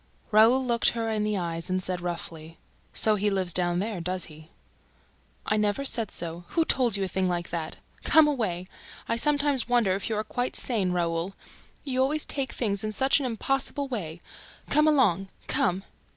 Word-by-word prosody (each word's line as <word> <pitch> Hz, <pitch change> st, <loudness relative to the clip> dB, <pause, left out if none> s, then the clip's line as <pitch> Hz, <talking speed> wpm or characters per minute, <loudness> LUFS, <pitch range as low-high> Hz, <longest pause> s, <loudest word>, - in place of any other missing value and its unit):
Raoul 230 Hz, +5 st, +5 dB
looked 235 Hz, -1 st, +3 dB
her 225 Hz, -1 st, -1 dB
in 215 Hz, -1 st, 0 dB
the 210 Hz, -1 st, 0 dB
eyes 170 Hz, -1 st, -3 dB
and 185 Hz, -, +1 dB
said 180 Hz, -1 st, -2 dB
roughly: 165 Hz, -2 st, -6 dB, 0.3 s
"So 215 Hz, -, +3 dB
he 205 Hz, +1 st, +1 dB
lives 190 Hz, -3 st, -1 dB
down 175 Hz, -1 st, +2 dB
there, 200 Hz, -1 st, -2 dB
does 180 Hz, +1 st, -2 dB
he?" 155 Hz, 0 st, -14 dB, 1.0 s
"I 215 Hz, -, +1 dB
never 210 Hz, +6 st, 0 dB
said 230 Hz, -6 st, 0 dB
so... 170 Hz, +1 st, -4 dB
Who 330 Hz, -, +1 dB
told 245 Hz, -8 st, +2 dB
you 195 Hz, -, -1 dB
a -, -, -1 dB
thing 185 Hz, 0 st, -1 dB
like 175 Hz, -1 st, -3 dB
that? 165 Hz, -2 st, -4 dB, 0.3 s
Come 315 Hz, -1 st, +6 dB
away! 215 Hz, -11 st, -1 dB, 0.4 s
I -, -, 0 dB
sometimes 285 Hz, -1 st, +2 dB
wonder 235 Hz, -6 st, +3 dB
if 195 Hz, +3 st, -3 dB
you 220 Hz, -, -1 dB
are 215 Hz, -, -1 dB
quite 245 Hz, +3 st, -3 dB
sane, 205 Hz, -7 st, 0 dB
Raoul... 170 Hz, +1 st, -1 dB, 0.5 s
You 260 Hz, -2 st, -1 dB
always 295 Hz, +3 st, +1 dB
take 275 Hz, -2 st, -3 dB
things 200 Hz, -4 st, 0 dB
in 215 Hz, 0 st, -3 dB
such 265 Hz, +5 st, +3 dB
an 270 Hz, -, -1 dB
impossible 270 Hz, +4 st, -1 dB
way... 175 Hz, -10 st, -5 dB, 0.5 s
Come 300 Hz, +2 st, +4 dB
along! 205 Hz, -, +3 dB, 0.2 s
Come!" 185 Hz, +1 st, 0 dB
210 Hz, 185 wpm, -27 LUFS, 180-255 Hz, 1.0 s, Come